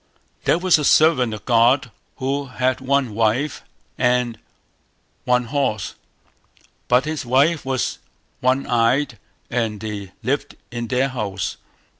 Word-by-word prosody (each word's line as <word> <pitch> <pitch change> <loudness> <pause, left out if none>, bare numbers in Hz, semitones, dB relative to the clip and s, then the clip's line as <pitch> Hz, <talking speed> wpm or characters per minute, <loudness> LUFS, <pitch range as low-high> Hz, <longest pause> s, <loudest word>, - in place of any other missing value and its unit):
There - - +4
was 180 -2 +4
a - - -2
servant 145 -5 +4
of 105 -1 -7
God 125 +2 +3 0.2
who 140 +1 -2
had 130 0 -1
one 135 -3 +1
wife 115 +7 0 0.4
and 125 -2 +1 0.9
one 125 0 +3
horse; 125 -5 -1 0.9
but 125 +3 +3
his 155 -1 -3
wife 140 +6 +2
was 130 -1 -2 0.4
one 130 +2 +1
eyed, 120 +1 +1 0.3
and 115 -3 -1
they 100 -3 -6
lived 135 +5 -2
in 120 -1 -4
their 130 +3 +1
house. 105 -7 -3
125 Hz, 125 wpm, -21 LUFS, 115-140 Hz, 0.9 s, There